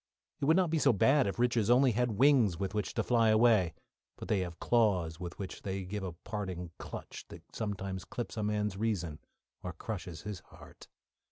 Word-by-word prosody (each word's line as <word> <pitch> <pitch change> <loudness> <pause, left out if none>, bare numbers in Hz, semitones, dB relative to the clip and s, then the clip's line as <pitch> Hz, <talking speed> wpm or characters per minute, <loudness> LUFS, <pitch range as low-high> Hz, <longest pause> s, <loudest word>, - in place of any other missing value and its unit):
It - - -1
would 160 +4 +5
not 180 -4 +2
be 165 - +2
so 140 - +5
bad 135 +6 +4
if 100 - -3
riches 120 -3 +2
only 125 +1 +5
had 120 -2 0
wings 125 - +4
with 95 -1 -3
which 105 -1 -2
to - - +1
fly 115 -2 +3
away; 110 -6 +4 0.4
but - - -9
they 105 - +2
have 90 -2 -4
claws 95 -9 +2
with 85 -1 -6
which 95 -3 -6
they 95 -1 -3
give 100 +3 -4
a 95 -3 -4
parting 90 -2 -5
clutch - - -8
that - - -12
sometimes 95 -3 -4
clips 120 - -6
a 110 - -2
man's 105 -1 -1
reason, 90 -8 -2 0.4
or 90 - -5
crushes 90 -8 -6
his 105 -2 -5
heart. - - -15
105 Hz, 195 wpm, -32 LUFS, 95-120 Hz, 0.4 s, would